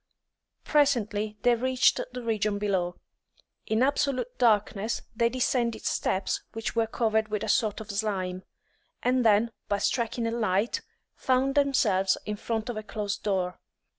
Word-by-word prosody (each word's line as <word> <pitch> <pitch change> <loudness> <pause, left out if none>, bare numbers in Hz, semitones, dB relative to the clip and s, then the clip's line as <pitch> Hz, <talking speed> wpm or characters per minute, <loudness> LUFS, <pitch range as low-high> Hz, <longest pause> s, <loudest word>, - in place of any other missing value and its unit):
Presently 215 -8 +1
they 245 - +5
reached 255 +2 +3
the 250 0 -6
region 215 -2 0
below. 190 -4 -1 0.7
In 220 +3 +2
absolute 260 -3 0
darkness 215 -2 +2
they 235 +1 +3
descended 235 -2 0
steps 190 - 0
which 225 +1 -4
were 230 -1 +2
covered 220 -1 +1
with 210 -1 -3
a - - -3
sort 215 -3 +1
of 220 -1 -7
slime, 195 -3 -2 0.6
and 250 0 +2
then, 220 +1 +4 0.2
by 205 - +2
striking 235 +2 -1
a 230 - 0
light, 220 -2 0 0.3
found 260 +1 +1
themselves 225 -10 +2
in 210 - -2
front 220 +1 -3
of 240 -3 -4
a - - -2
closed 205 -1 -4
door. 185 -4 -1
220 Hz, 145 wpm, -27 LUFS, 205-245 Hz, 0.7 s, they